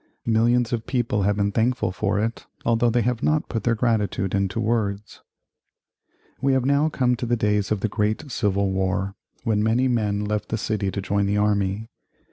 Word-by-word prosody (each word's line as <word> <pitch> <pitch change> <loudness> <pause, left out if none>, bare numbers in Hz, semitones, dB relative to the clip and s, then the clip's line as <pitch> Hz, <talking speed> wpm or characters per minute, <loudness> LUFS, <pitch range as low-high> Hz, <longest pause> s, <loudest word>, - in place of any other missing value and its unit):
Millions 120 +2 +2
of 115 -1 -3
people 120 -5 0
have 100 +1 +2
been 100 0 0
thankful 115 -1 +1
for 95 - -1
it, 115 +2 -3 0.2
although 115 +1 +3
they 120 0 +2
have 125 0 -1
not 155 0 +1
put 115 -3 -3
their 115 0 +2
gratitude 105 -5 0
into 100 +2 0
words. 105 -2 -2 1.2
We 135 0 +2
have 130 -1 +1
now 140 +3 +3
come 125 -4 +1
to 120 - -3
the 120 - +2
days 105 -2 0
of 105 -2 0
the 110 - +1
Great 105 +6 -1
Civil 100 -4 0
War, 95 +1 -1 0.3
when 110 -3 +1
many 115 +4 +2
men 105 -4 0
left 105 0 -2
the 110 - -1
city 105 -2 -1
to 100 0 -4
join 100 +1 0
the 100 +1 +1
army. 105 0 0
110 Hz, 190 wpm, -24 LUFS, 100-120 Hz, 1.2 s, although